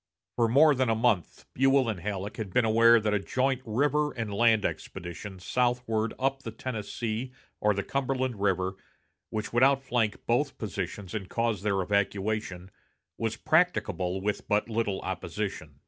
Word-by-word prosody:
For 120 -1 +3
more 145 +6 +6
than 130 -2 +1
a 115 - +3
month 110 -6 0
Buell 135 0 +3
and 110 -5 -2
Halleck 100 +2 -4
had 105 -4 -5
been 125 +2 +3
aware 115 +1 +6
that 105 -1 0
a 105 - +2
joint 130 +5 0
river 145 +6 +1
and 115 -4 -4
land 110 0 +3
expedition 90 +3 -5
southward 120 +1 0
up 135 +1 0
the 115 - -6
Tennessee 115 +1 -4 0.3
or 105 -1 +2
the 100 - -1
Cumberland 130 -5 -2
River, 95 -1 0 0.5
which 110 0 -4
would 120 - +3
outflank 130 -5 +2
both 130 +4 +1
positions 100 -1 -5
and 100 -4 -4
cause 115 -4 0
their 100 -2 0
evacuation, 100 -1 -1 0.5
was 115 -1 -1
practicable 100 - +1
with 105 +1 -2
but 105 +1 +1
little 110 -3 -1
opposition. - - -4
110 Hz, 155 wpm, -28 LUFS, 100-125 Hz, 0.5 s, more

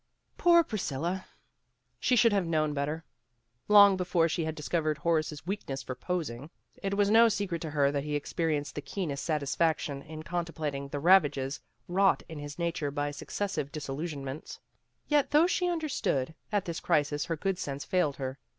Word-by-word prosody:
Poor 340 -1 +5
Priscilla! 180 - -3 0.7
She 250 - +2
should 230 -2 +5
have 195 -4 +1
known 155 -2 +1
better. 150 +3 -2 0.6
Long 205 -2 +8
before 175 -2 +2
she 165 0 -1
had 160 0 -3
discovered 155 0 -1
Horace's 155 -1 -1
weakness 160 -8 -4
for 130 - -4
posing. 145 -2 -4 0.3
It 195 0 -1
was 205 0 +2
no 230 +1 +7
secret 190 -6 -2
to 160 - -4
her 145 -2 +2
that 140 -1 -1
he 150 0 -2
experienced 150 0 -1
the 145 - -4
keenest 150 -5 -4
satisfaction 150 -1 0
in 155 +1 -9
contemplating 160 -5 -3
the 140 - -5
ravages 145 -5 +3 0.3
wrought 195 +2 +3
in 160 -3 -8
his 145 0 -7
nature 170 -4 -1
by 145 0 -2
successive 150 0 -3
disillusion 145 0 -5
ments. 135 +3 -7 0.5
Yet 295 -2 +3
though 300 +3 +5
she 360 0 +1
understood, 260 - -1 0.2
at 205 -2 +1
this 170 -1 -4
crisis 145 0 +1
her 165 - -2
good 190 +3 -1
sense 140 -3 -4
failed 180 -7 +1
her. 130 0 -5
160 Hz, 170 wpm, -29 LUFS, 145-190 Hz, 0.7 s, Long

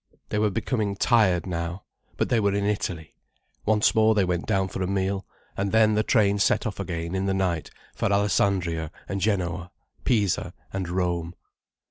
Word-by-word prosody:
They 105 - 0
were 105 0 +3
becoming 105 0 -1
tired 100 -6 +3
now. 85 +1 -4 0.3
But - - 0
they 120 - +3
were 100 -2 +1
in 100 0 0
Italy. 90 -7 -2 0.5
Once 110 0 +4
more 110 0 +4
they 100 -2 +3
went 90 -1 -2
down 95 -3 +1
for 95 - -5
a 90 - 0
meal. 95 0 -1 0.3
And 100 0 -1
then 110 -1 +5
the 105 - +3
train 105 -3 +2
set 105 +1 +2
off 105 -3 -4
again 85 -2 -3
in 95 +1 -1
the 95 - +1
night 90 -5 -1 0.2
for - - -1
Alessandria 95 -5 +1 0.2
and 100 0 -3
Genoa, 90 -4 -1 0.3
Pisa 105 -7 +1 0.2
and 95 -2 -3
Rome. 85 -1 -1
95 Hz, 175 wpm, -25 LUFS, 90-105 Hz, 0.5 s, then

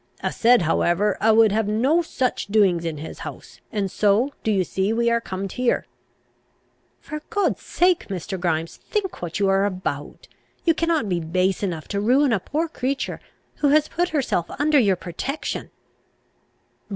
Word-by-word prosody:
A' - - 0
said 240 -4 +4
however, 175 +5 +2
a' 220 - +5
would 220 -1 +5
have 220 0 +1
no 260 +11 +2
such 260 - -2
doings 195 -5 +3
in 160 -2 -3
his 155 +2 -8
house, - - -9
and 200 -3 -2
so, 215 +7 +2
do - - 0
ye 195 -3 +2
see, 190 +3 -1
we 235 +1 +2
are 235 0 +2
comed 195 -2 -5
here." 250 -1 0 1.2
"For 305 0 -6
God's 380 - 0
sake, 355 0 +1
Mr. 190 0 -4
Grimes, 165 -2 -1
think 405 -4 -3
what 175 +2 -4
you 200 - +2
are 195 0 +3
about! 185 -8 -4 0.4
You 330 - +5
cannot 330 -7 0
be 180 -3 0
base 180 +4 0
enough 170 -6 -3
to 200 -1 -1
ruin 255 +4 +3
a 210 - +2
poor 310 - -2
creature 270 -3 -3 0.4
who 290 - +2
has 300 +2 +4
put 350 +1 0
herself 255 - 0
under 295 +1 +4
your 200 -6 +3
protection! 185 - -5
215 Hz, 170 wpm, -23 LUFS, 185-280 Hz, 1.2 s, a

